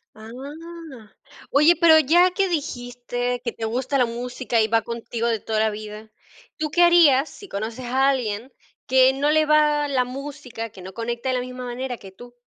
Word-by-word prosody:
Ah. 275 +2 -10 0.4
Oye, 305 +4 +5
pero 325 -2 +7
ya 340 +5 +4
que 385 +1 0
dijiste 245 -5 -3
que 235 - -2
te 225 - -6
gusta 255 +5 -1
la 250 - +3
música 240 0 -2
y 220 - +2
va 225 0 +2
contigo 235 0 -4
de 225 -2 0
toda 220 +1 -2
la 220 0 +2
vida, 215 +1 -9 0.5
¿tú 305 -1 -3
qué 350 - +2
harías 320 -5 +5
si 400 - -13
conoces 225 - -5
a 265 +3 +2
alguien 245 -2 -2 0.3
que 260 0 +5
no 280 +2 0
le 310 0 +4
va 300 -1 +3
la 255 -2 +1
música, 255 -3 -7
que 190 -3 -13
no 190 +1 -10
conecta 235 +2 -4
de 255 - +1
la 250 - -1
misma 250 0 -7
manera 245 0 -5
que 195 - -12
tú? 240 +5 -14
250 Hz, 190 wpm, -23 LUFS, 230-295 Hz, 0.5 s, pero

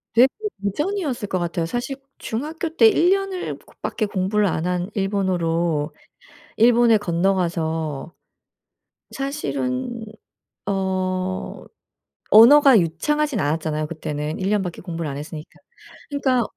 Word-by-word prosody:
되게 245 +3 +7 0.4
도전이었을 290 - -2
것 185 -2 -1
같아요. 170 -1 -2
사실 245 +9 -3 0.2
중학교 310 +8 -4
때 450 - +7
1 360 -5 +4
년을 390 -1 -2 0.2
밖에 215 - -1
공부를 200 +1 0
안 165 -2 -1
한 180 +1 -1
일본어로 175 -6 0 0.7
일본에 235 0 +5
건너가서 170 -5 -1 1.0
사실은 230 - -3 0.6
어 185 -1 -2 0.7
언어가 260 +3 +8
유창하진 265 - 0
않았잖아요 155 -1 -1
그때는. 150 -1 -4
1 190 +1 -1
년 210 -1 +2
밖에 180 -3 -5
공부를 165 -3 -4
안 140 - -5
했으니까. 150 +1 -8 0.6
그러니까 265 -4 +1
190 Hz, 255 characters per minute, -22 LUFS, 165-245 Hz, 1.0 s, 언어가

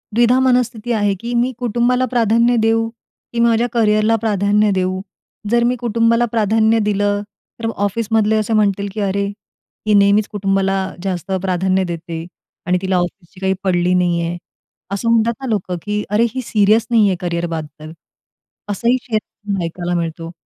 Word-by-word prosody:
द्विधा 240 +2 +4
मनस्थिती 245 -3 +1
आहे 205 -2 +1
की 235 +3 -5
"मी 240 +2 +2
कुटुंबाला 245 +2 +1
प्राधान्य 235 +1 +3
देऊ 225 0 +2 0.5
की 235 - -2
माझ्या 235 0 +3
करिअरला 215 -1 +3
प्राधान्य 205 0 +2
देऊ?" 185 0 -1 0.5
जर 235 0 +3
मी 245 +1 +2
कुटुंबाला 230 +1 +2
प्राधान्य 220 0 +2
दिलं 205 0 +1 0.4
तर 225 - -1
ऑफिसमधले 220 +1 +1
असे 215 +1 -1
म्हणतील 200 -2 +1
की 215 - -5
"अरे, 200 0 0
ती 210 +1 -7
नेहमीच 200 +1 +4
कुटुंबाला 195 -1 0 0.3
जास्त 190 -1 -3
प्राधान्य 190 0 +1
देते 170 -1 -5 0.4
आणि 180 0 +3
तिला 190 -1 0
ऑफिसची 175 0 -4
काही 190 0 +1
पडली 180 -1 +1
नाही 175 -1 +2
आहे." 170 +1 -3 0.5
असं 200 +4 -1
म्हणतात 230 0 +3
ना 265 - -4
लोकं 185 -4 -2
की 210 0 -2
"अरे 210 +3 +2
ही 260 - -1
सीरियस 215 -1 +2
नाही 225 -3 +4
आहे 190 - +1
करियरबद्दल" 165 -3 -4 0.8
असंही 235 +5 +1
शेयर 210 -3 -4
ऐकायला 175 +1 -4
मिळतो 165 0 -5
210 Hz, 155 wpm, -18 LUFS, 185-230 Hz, 0.8 s, द्विधा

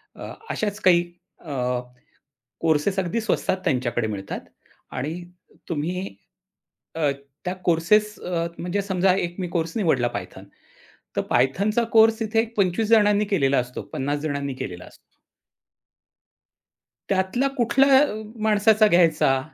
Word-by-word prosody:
अ, - - -8 0.2
अशाच 210 -1 -2
काही 175 -2 +5 0.4
अ, 155 - -10 1.1
कोर्सेस 165 +4 +1
अगदी 190 +5 0
स्वस्तात 215 -3 0
त्यांच्याकडे 120 -3 0
मिळतात 100 -2 -5 0.5
आणि 145 +5 -3 0.6
तुम्ही 170 +3 -2 0.9
अ, 155 -3 +1 0.3
त्या 180 +1 -2
कोर्सेस 210 +6 +2
अ, 170 -2 -2
म्हणजे 180 +3 -2
समजा 190 -1 +2
एक 175 -2 -3
मी 180 - -2
कोर्स 165 +2 -2
निवडला 135 - +2
Python, - - -8 0.7
तर - - +1
Pythonचा 205 - +2
कोर्स 225 0 +5
तिथे 225 0 +1
एक 230 0 -4
25 200 +2 +1
जणांनी 210 -2 +4
केलेला 140 -10 +2
असतो, 125 0 -3
50 145 +2 -2
जणांनी 140 -3 -3
केलेला 90 -7 -7
असतो. - - -16 2.1
त्यातल्या 195 +8 +1
कुठल्या 265 +3 +4
अ, 290 -8 +1 0.3
माणसाचा 215 0 +4
घ्यायचा 160 -7 +3
180 Hz, 125 wpm, -23 LUFS, 150-210 Hz, 2.1 s, काही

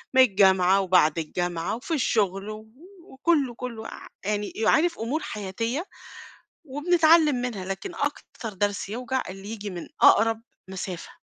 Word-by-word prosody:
من 260 - +8
الجامعة 190 -3 +4
وبعد 175 -4 +3
الجامعة 175 +2 -2
وفي 260 +8 -5
الشغل، 200 -6 0
و 215 +1 -8 0.4
وكلّه 275 -3 +1
كلّه 235 -3 -6
عا - - -10 0.2
يعني 210 0 -2
يو 220 0 0
عارف 340 +2 +2
أُمور 260 +8 -2
حياتية، 230 - -3 0.8
وبنتعلِّم 315 +1 +4
منها 245 -7 -3
لكن 330 - -5
أكتر 280 -6 -4
درس 200 0 -1
يوجع 250 +4 -2
اللي 195 +2 -9
ييجي 210 -2 -5
من 175 -2 -7 0.2
أقرب 225 +1 +5 0.3
مسافة. 190 -2 -6
220 Hz, 140 wpm, -25 LUFS, 190-260 Hz, 0.8 s, من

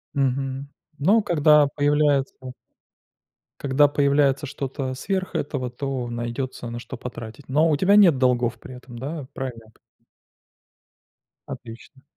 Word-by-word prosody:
Мгм, 135 0 -1 0.3
ну, 205 +8 +4
когда 150 -4 +5
появляется 145 -1 +2 1.3
когда 140 +1 +4
появляется 140 0 +2
что-то 135 -1 -4
сверх 185 +6 -3
этого, 135 -3 -2
то 125 -1 -4
найдётся 120 +1 -4
на 120 0 -5
что 130 +1 -8
потратить. 120 +2 -9
Но 155 +4 +3
у 150 - +2
тебя 190 +6 +4
нет 180 -9 +6
долгов 120 -2 +1
при 130 - -10
этом, 125 -1 -12
да, 145 +2 -5
правильно 125 -4 -6
я 110 - -20
п - - -30 1.7
Отлично. 125 +3 -10
135 Hz, 130 wpm, -23 LUFS, 125-145 Hz, 1.7 s, нет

